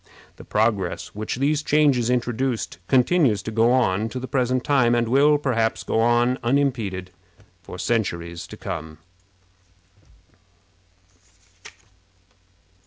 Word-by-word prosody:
The -, -, -12 dB
progress 105 Hz, -5 st, -1 dB
which 105 Hz, +1 st, -4 dB
these 145 Hz, +4 st, 0 dB
changes 145 Hz, -6 st, +2 dB
introduced 120 Hz, -4 st, -2 dB
continues 130 Hz, -, +2 dB
to 110 Hz, -, -5 dB
go 115 Hz, +2 st, +3 dB
on 110 Hz, -4 st, +1 dB
to 130 Hz, -, -5 dB
the 130 Hz, -, -6 dB
present 130 Hz, 0 st, 0 dB
time, 130 Hz, -5 st, +3 dB
and 120 Hz, -1 st, +1 dB
will, 145 Hz, +5 st, +4 dB
perhaps, 120 Hz, -6 st, -1 dB
go -, -, -1 dB
on 120 Hz, +2 st, +2 dB
unimpeded 120 Hz, -8 st, -1 dB, 0.5 s
for -, -, -10 dB
centuries 85 Hz, -6 st, -2 dB
to -, -, -11 dB
come. 80 Hz, -1 st, -6 dB
120 Hz, 110 wpm, -23 LUFS, 110-130 Hz, 0.5 s, will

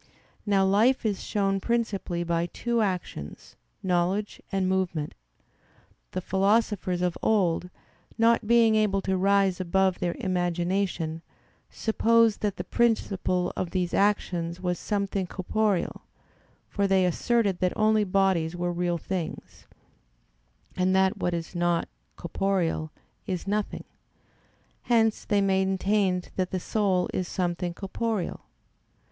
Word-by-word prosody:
Now 195 Hz, -1 st, +3 dB
life 220 Hz, +7 st, +3 dB
is 205 Hz, -3 st, 0 dB
shown 195 Hz, -1 st, 0 dB
principally 200 Hz, -6 st, -1 dB
by 170 Hz, 0 st, 0 dB
two 235 Hz, +4 st, -1 dB
actions, 180 Hz, -, -4 dB, 0.3 s
knowledge 185 Hz, +3 st, 0 dB
and 195 Hz, -1 st, 0 dB
movement. 180 Hz, -5 st, -1 dB, 1.0 s
The 185 Hz, -, -2 dB
philosophers 195 Hz, -1 st, +1 dB
of 180 Hz, -1 st, -1 dB
old, 180 Hz, -5 st, +1 dB, 0.5 s
not 230 Hz, -1 st, +3 dB
being 230 Hz, -1 st, +5 dB
able 205 Hz, -3 st, +2 dB
to 190 Hz, -, 0 dB
rise 195 Hz, -1 st, +2 dB
above 190 Hz, +1 st, +1 dB
their 175 Hz, -1 st, -1 dB
imagination, 175 Hz, -2 st, -1 dB, 0.5 s
supposed 230 Hz, 0 st, +2 dB
that 205 Hz, -2 st, -1 dB
the 180 Hz, -, -3 dB
principle 195 Hz, -4 st, 0 dB
of 185 Hz, -, -2 dB
these 180 Hz, -1 st, -1 dB
actions 180 Hz, -4 st, 0 dB
was 180 Hz, -1 st, -2 dB
something 200 Hz, -2 st, -2 dB
corporeal: 200 Hz, +1 st, -1 dB, 0.7 s
for 200 Hz, -1 st, 0 dB
they 190 Hz, -1 st, +3 dB
asserted 200 Hz, +2 st, +1 dB
that 180 Hz, -1 st, +1 dB
only 215 Hz, 0 st, +3 dB
bodies 185 Hz, -4 st, +1 dB
were 175 Hz, 0 st, -2 dB
real 175 Hz, 0 st, 0 dB
things; 175 Hz, 0 st, -6 dB, 1.1 s
and 185 Hz, +1 st, +2 dB
that 190 Hz, 0 st, +3 dB
what 175 Hz, -, -1 dB
is 165 Hz, +1 st, -5 dB
not 175 Hz, -1 st, +1 dB, 0.3 s
corporeal 170 Hz, -3 st, -1 dB, 0.4 s
is 185 Hz, -3 st, -3 dB
nothing: 205 Hz, +1 st, -2 dB, 1.0 s
hence 225 Hz, -2 st, +2 dB
they 205 Hz, -1 st, +2 dB
maintained 190 Hz, -1 st, +1 dB
that 185 Hz, -1 st, 0 dB
the 185 Hz, -, -2 dB
soul 190 Hz, -2 st, +1 dB
is 185 Hz, -, -1 dB
something 175 Hz, -1 st, -2 dB
corporeal. 205 Hz, 0 st, -3 dB
190 Hz, 120 wpm, -27 LUFS, 175-205 Hz, 1.1 s, being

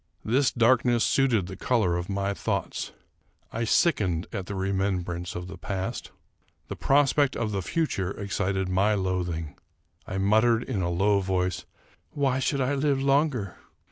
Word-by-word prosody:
This 130 Hz, +4 st, +3 dB
darkness 120 Hz, 0 st, +3 dB
suited 125 Hz, -8 st, +2 dB
the 95 Hz, +1 st, -7 dB
color 105 Hz, -9 st, +1 dB
of 85 Hz, +2 st, -4 dB
my 100 Hz, 0 st, -1 dB
thoughts. -, -, -3 dB, 0.6 s
I 115 Hz, +1 st, -1 dB
sick 155 Hz, +5 st, +3 dB
ened 90 Hz, -4 st, -1 dB
at 95 Hz, -2 st, -4 dB
the 100 Hz, -, -4 dB
remembrance 95 Hz, -2 st, -2 dB
of 90 Hz, -, -4 dB
the 95 Hz, -1 st, -9 dB
past. 95 Hz, +6 st, -4 dB, 0.6 s
The -, -, -4 dB
prospect 140 Hz, 0 st, +3 dB
of 110 Hz, -2 st, -2 dB
the 100 Hz, -1 st, -1 dB
future 95 Hz, -, -1 dB
excited 100 Hz, -1 st, -2 dB
my 95 Hz, +3 st, +2 dB
loathing. 90 Hz, -5 st, -2 dB, 0.5 s
I 95 Hz, -, -4 dB
muttered, 110 Hz, +4 st, +3 dB
in 110 Hz, -8 st, -3 dB
a 85 Hz, -, 0 dB
low 100 Hz, +4 st, +2 dB
voice, 90 Hz, -1 st, -1 dB, 0.3 s
" -, -, -36 dB
Why 135 Hz, -2 st, +1 dB
should 135 Hz, +1 st, 0 dB
I 130 Hz, +2 st, +1 dB
live 140 Hz, -1 st, +1 dB
longer 135 Hz, -, +1 dB
100 Hz, 160 wpm, -26 LUFS, 95-125 Hz, 0.6 s, This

